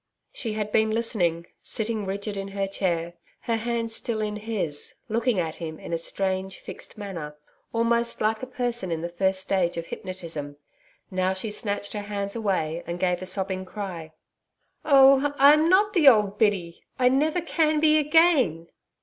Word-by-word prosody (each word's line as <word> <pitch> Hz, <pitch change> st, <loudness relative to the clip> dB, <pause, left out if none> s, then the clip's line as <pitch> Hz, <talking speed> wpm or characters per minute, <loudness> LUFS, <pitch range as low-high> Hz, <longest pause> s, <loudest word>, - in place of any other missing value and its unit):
She 225 Hz, -4 st, -3 dB
had 210 Hz, -1 st, -3 dB
been 220 Hz, 0 st, +3 dB
listening, 195 Hz, -7 st, 0 dB, 0.2 s
sitting 220 Hz, -2 st, -3 dB
rigid 200 Hz, +2 st, -4 dB
in 195 Hz, 0 st, -4 dB
her 195 Hz, -, +1 dB
chair, 175 Hz, -3 st, -2 dB, 0.3 s
her 230 Hz, -1 st, -1 dB
hands 230 Hz, 0 st, -2 dB
still 225 Hz, -2 st, -2 dB
in 210 Hz, -1 st, -2 dB
his, 205 Hz, -9 st, -4 dB
looking 230 Hz, 0 st, +1 dB
at 160 Hz, -2 st, -3 dB
him 160 Hz, -2 st, -6 dB
in -, -, -7 dB
a -, -, +1 dB
strange 190 Hz, +2 st, -3 dB
fixed -, -, -11 dB
manner, 165 Hz, -8 st, -7 dB, 0.3 s
almost 235 Hz, 0 st, +1 dB
like 220 Hz, +1 st, 0 dB
a 255 Hz, -, -5 dB
person 240 Hz, -7 st, -3 dB
in 160 Hz, -1 st, -2 dB
the 170 Hz, -, -3 dB
first 190 Hz, +2 st, 0 dB
stage 185 Hz, -3 st, 0 dB
of 165 Hz, -, -4 dB
hypnotism. 165 Hz, -6 st, -7 dB, 0.5 s
Now 185 Hz, 0 st, +1 dB
she 200 Hz, +3 st, -4 dB
snatched 205 Hz, -1 st, -3 dB
her 210 Hz, -, -3 dB
hands 200 Hz, 0 st, -4 dB
away 180 Hz, -7 st, -1 dB
and 170 Hz, +1 st, -4 dB
gave 180 Hz, -1 st, 0 dB
a 185 Hz, -, -4 dB
sobbing 190 Hz, 0 st, -2 dB
cry. 185 Hz, -5 st, -7 dB, 0.7 s
'Oh, 275 Hz, 0 st, +5 dB
I'm 300 Hz, +4 st, +6 dB
not 405 Hz, +3 st, +4 dB
the 330 Hz, -7 st, +4 dB
old 210 Hz, -5 st, +5 dB
Biddy. 190 Hz, -6 st, 0 dB, 0.2 s
I 250 Hz, -, +3 dB
never 300 Hz, +7 st, +2 dB
can 310 Hz, -2 st, +1 dB
be 310 Hz, 0 st, +6 dB
again.' 295 Hz, -, +3 dB
205 Hz, 170 wpm, -25 LUFS, 185-235 Hz, 0.7 s, I'm